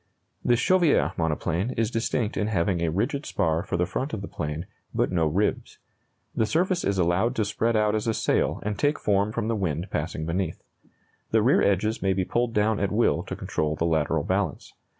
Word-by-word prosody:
The 120 - +4
Chauviere 170 +5 +3
monoplane 85 - -1
is 115 0 +1
distinct 115 -1 -1
in 105 - 0
having 95 -3 0
a 85 - +1
rigid 120 - -1
spar 80 0 0
for 85 - -3
the 90 - +2
front 135 - -3
of 100 - -6
the - - -5
plane, 75 +3 -4 0.3
but - - +1
no 85 -3 +2
ribs. 95 +8 -1 0.6
The 110 - +1
surface 175 - +1
is 100 0 0
allowed 95 +8 +2
to 110 - +1
spread 115 +3 0
out 105 -1 +2
as 110 +1 -1
a 115 - +2
sail - - 0
and 105 0 -3
take 145 +1 +2
form 100 +1 +1
from 110 -1 -2
the 115 - 0
wind 90 -2 -2
passing 80 0 -3
beneath. 85 0 -2 0.7
The - - +3
rear - - +4
edges 105 +3 +1
may 95 0 +2
be 95 0 -1
pulled 120 +2 -1
down 105 +1 +2
at 100 -1 0
will 110 +3 +2
to - - -6
control 75 0 -2
the 80 - -1
lateral 80 -1 +1
balance. 95 -4 -2
100 Hz, 205 wpm, -26 LUFS, 85-115 Hz, 0.7 s, The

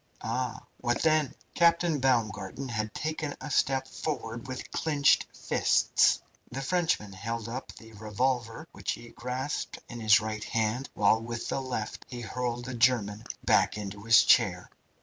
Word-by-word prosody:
Ah! 125 -3 -3
what 120 0 -1
then?" 155 -3 +2 0.2
Captain 170 -2 +3
Baumgarten 115 -2 0
had 110 -2 -2
taken 155 0 -3
a 150 - -7
step 135 0 +2
forward 120 -5 -4
with 130 -1 -6
clenched 150 -3 +3
fists. - - +3 0.3
The 135 +3 -4
Frenchman 160 - 0
held 115 +3 -4
up 125 +3 -6
tho 110 -1 -13
revolver 120 +5 -1
which - - -3
he 120 - -10
grasped 125 +5 -4
in 120 - -8
his 110 -1 +6
right 110 0 -4
hand, 115 +4 -1
while 110 +2 +4
with 115 0 -5
the 135 - -1
left 125 -5 -4
he 120 -1 -6
hurled 120 +1 -3
the 130 - -5
German 115 -3 +2 0.2
back - - +3
into 100 -1 -6
his 115 +1 +6
chair. - - +3
120 Hz, 150 wpm, -29 LUFS, 110-135 Hz, 0.3 s, his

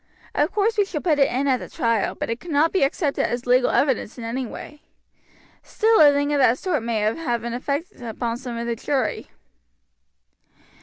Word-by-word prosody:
Of - - +1
course 425 +1 +1
we 405 - +4
shall 345 -5 -4
put 310 -5 +1
it 275 - +4
in 270 +3 -1
at 260 -2 +3
the - - -9
trial, 230 -4 0
but - - -4
it 230 - -3
cannot 320 0 +1
be 380 - +1
accepted 280 +1 0
as 240 +2 -3
legal 250 0 +3
evidence 265 -5 0
in 240 - -7
any 240 +2 -3
way. 295 +6 -10 0.8
Still 445 -2 +2
a 295 -1 +8
thing 285 +1 0
of 290 - +1
that 255 -2 +4
sort 350 -6 -1
may 225 -1 -1
have 235 +1 -1
an 235 0 -4
effect 280 +5 -4
upon 235 0 -3
some 245 -2 -6
of 235 - -3
the 235 0 -2
jury." 265 +3 -2
265 Hz, 200 wpm, -23 LUFS, 235-295 Hz, 0.8 s, a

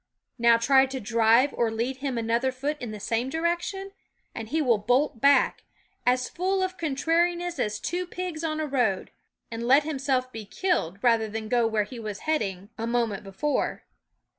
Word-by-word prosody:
Now 235 0 +6
try 265 +3 +4
to 265 0 -5
drive 230 +4 +3
or 235 -1 +1
lead 235 +4 -2
him 265 -2 -3
another 235 +3 +1
foot 280 +4 -3
in 245 - -4
the 215 -1 -7
same 230 +5 -1
direction, 345 +5 -2 0.4
and 225 -1 -6
he 320 - 0
will 245 -8 +3
bolt 245 +3 +1
back, 280 +1 +4 0.4
as 250 0 +3
full 375 +2 -1
of 370 0 -2
contrariness 340 +3 0
as 210 0 -1
two 355 +7 -3
pigs 355 -3 -5
on 310 -1 -1
a 310 - -1
road, 245 -9 0 0.4
and 230 0 -5
let 275 +4 +6
himself 270 -4 -1
be 225 -2 -7
killed 210 - -1
rather 230 -2 +3
than 220 +1 -5
go 240 -1 +3
where 220 -2 +1
he 235 +3 -9
was 210 -3 -6
heading 220 -12 -1
a - - -16
THE 195 - -16 0.2
WOODS 235 - -3
moment 230 -5 0
before. 200 +10 -2
255 Hz, 190 wpm, -26 LUFS, 225-310 Hz, 0.4 s, Now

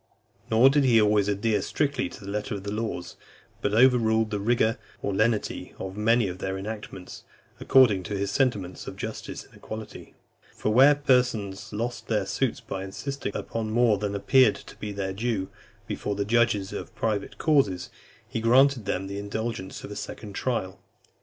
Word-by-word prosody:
Nor 120 +4 +6
did 145 0 +3
he 120 -4 +5
always 105 -1 +3
adhere 105 +1 +1
strictly 140 -3 -1
to 100 - -11
the 100 - -5
letter 105 +2 -3
of 100 - -7
the 100 - -4
laws, 105 -5 -4 0.4
but 105 +1 0
overruled 110 -3 +4
the 105 - -1
rigour 115 +2 +1 0.2
or 100 - -1
lenity 110 +1 0
of 95 0 -6
many 115 +1 +3
of 90 0 -6
their 95 0 -3
enactments, 100 -2 -7 0.4
according 120 -8 +5
to 100 - -3
his 100 0 -1
sentiments 100 -8 -1
of - - -6
justice - - -6
and - - -23
equity. 110 -1 -9 0.4
For 105 - -1
where 135 +5 +7
persons 125 -8 +1
lost 115 +3 -4
their - - 0
suits - - -1
by 95 0 -5
insisting 125 +4 -5
upon 115 -1 -3
more 115 -2 +3
than 100 0 -2
appeared 125 +3 +4
to - - -12
be 105 - -5
their 95 -1 -3
due, 105 -2 -2 0.4
before 105 - -3
the 100 0 -1
judges 110 -3 +2
of 115 - -7
private 105 -2 -2
causes, 105 - +1 0.4
he 115 - -3
granted 130 0 +4
them 95 - -1
the 100 +1 -5
indulgence 100 -1 -4
of - - -8
a - - -6
second 105 0 -7
trial. 95 -6 -2
110 Hz, 175 wpm, -26 LUFS, 100-120 Hz, 0.4 s, where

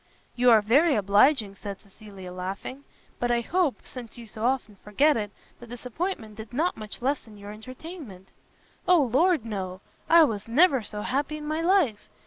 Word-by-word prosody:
"You 250 0 +4
are 220 -3 +6
very 280 +9 +4
obliging," 210 +2 +3
said 200 0 -7
Cecilia 195 -3 -12
laughing, 195 +9 -6 0.3
"but 245 - 0
I 240 0 +2
hope, 345 +2 0
since 240 -3 -9
you 235 - -9
so 215 0 -7
often 245 -5 -1
forgot 275 +11 +2
it, 210 -3 -2 0.3
the 240 - -12
disappointment 245 - -5
did 220 +1 -10
[not] 320 +8 0
much 215 +2 -7
lessen 255 -6 -2
your 205 0 -9
entertainment." 250 - -10 0.6
"O 360 -1 +6
Lord 285 +2 +2
no! 190 -4 -5 0.3
I 335 0 +8
was 215 -7 -1
never 275 +2 +4
so 210 0 -6
happy 290 +3 -1
in 300 - -8
my 310 +2 -2
life. 335 - +1
240 Hz, 170 wpm, -26 LUFS, 210-295 Hz, 0.6 s, I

